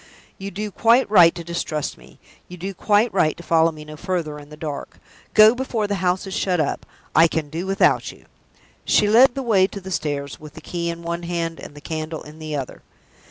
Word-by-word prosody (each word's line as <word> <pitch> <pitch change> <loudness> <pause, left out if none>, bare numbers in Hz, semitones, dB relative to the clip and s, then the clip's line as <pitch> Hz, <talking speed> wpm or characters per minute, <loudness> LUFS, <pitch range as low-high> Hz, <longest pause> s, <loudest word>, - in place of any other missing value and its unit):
"You 195 +1 -5
do 210 +2 -5
quite 235 +6 +3
right 175 -5 +7
to 170 - -6
distrust 165 -3 -3
me 60 +1 -18 0.3
you 180 - -10
do 190 +3 -5
quite 210 +4 +2
right 155 -5 +2
to 170 - -10
follow 165 0 +3
me 155 -1 -11
no 155 0 -9
further 165 -3 -3
in 145 0 -14
the 150 - -12
dark. 150 -2 -6 0.4
Go 215 +1 +8
before 245 -4 -2
the 205 - -2
house 180 +1 0
is 195 - -6
shut 180 -2 0
up. 155 - -2 0.3
I 165 +2 +7
can 155 -3 -3
do 170 +4 -4
without 195 0 +2
you." - - -19 0.6
She 210 - +3
led 240 +4 +6
the 270 - -3
way 200 -6 +3
to 200 - -8
the 190 0 -9
stairs, 145 -4 -3
with 150 -1 -12
the - - -9
key 170 -1 -3
in 170 0 -6
one 170 +1 -3
hand, 170 -1 -3
and - - -10
the 145 - -11
candle 155 0 -5
in 150 +1 -13
the 155 -1 -5
other. 135 -3 -5
170 Hz, 225 wpm, -22 LUFS, 155-195 Hz, 0.6 s, Go